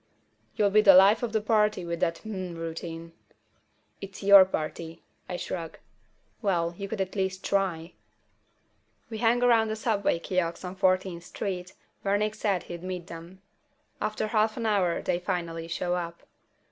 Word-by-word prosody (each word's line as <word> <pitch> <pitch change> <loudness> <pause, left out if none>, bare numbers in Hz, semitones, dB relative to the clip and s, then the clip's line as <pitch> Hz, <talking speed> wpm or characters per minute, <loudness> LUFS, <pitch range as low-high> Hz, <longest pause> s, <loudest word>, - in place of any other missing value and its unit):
"You'll 205 -2 +2
be 215 +1 +6
the 195 -3 +8
life 195 +4 +6
of 240 -2 -2
the 220 -1 0
party 210 -3 +1
with 170 0 -3
that 165 0 0
'Hmm' 185 -5 -5
routine." 165 0 -6 0.9
"It's 195 0 -9
your 200 -1 +9
party." 165 -1 -5 0.3
I 180 - -3
shrug. 165 -2 -5 0.6
"Well, 175 -5 0
you 200 +2 -6
could 215 +1 -5
at 190 +1 -4
least 190 -1 -2
try." 180 -4 -1 1.2
We 220 - -5
hang 240 +1 +2
around 230 -2 +4
the 220 - -2
subway 215 -5 0
kiosk 170 0 -2
on 180 +1 -6
Fourteenth 185 -2 0
Street, 185 -2 -5 0.3
where 200 +1 +1
Nick 210 +1 -1
said 205 -4 -1
he'd 170 -1 -8
meet 180 -1 -5
them. 170 +3 -11 0.6
After 215 0 -1
half 215 0 +1
an 230 - -3
hour 195 -6 +1
they 175 - 0
finally 170 -3 -3
show 175 +1 -2
up. 170 -1 -4
190 Hz, 160 wpm, -27 LUFS, 170-210 Hz, 1.2 s, your